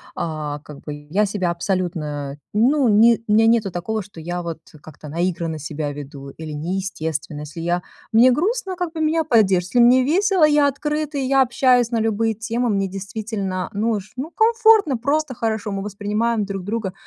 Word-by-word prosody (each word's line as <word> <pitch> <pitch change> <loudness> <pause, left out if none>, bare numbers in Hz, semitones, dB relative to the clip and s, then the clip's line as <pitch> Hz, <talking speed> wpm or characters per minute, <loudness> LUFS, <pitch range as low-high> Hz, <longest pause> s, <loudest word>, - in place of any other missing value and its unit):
А, 150 -3 -4
как 150 -2 -11
бы 150 - -6 0.2
я 210 +3 +3
себя 190 -3 -1
абсолютно, 165 -6 -3 0.2
ну 255 +5 +3
не 225 +2 +5
у 210 - +2
меня 225 +1 +5
нету 225 -3 +3
такого, 215 +6 -3
что 195 -3 -13
я 175 +2 -4
вот 165 -2 -5 0.2
как-то 150 -1 -12
наигранно 165 -1 -2
себя 150 0 -4
веду, 140 -1 -9
или 160 +2 -8
неестественно. 160 -2 -4
Если 150 +2 -8
я 175 +1 -1 0.3
мне 240 +3 +7
грустно, 385 - -1
как 350 -2 -3
бы 320 - -4
меня 315 +1 +2
поддержат. 195 - +3
Если - - +5
мне 245 +2 +6
весело, 365 +4 +3
я 295 -1 +4
открыта, 300 +1 -3
и 275 - 0
я 270 0 +4
общаюсь 250 -1 +3
на 230 - +1
любые 225 0 +1
темы, 230 +3 -2
мне 195 -2 0
действительно 195 -1 -4
нуж 210 -1 -2
ну 290 +6 -5
комфортно, 445 - +4
просто 280 +2 -1
хорошо. 220 -2 -2
Мы 195 0 -3
воспринимаем 210 +2 -1
друг 195 -1 -5
друга 205 -1 -3
210 Hz, 180 wpm, -21 LUFS, 175-255 Hz, 0.3 s, мне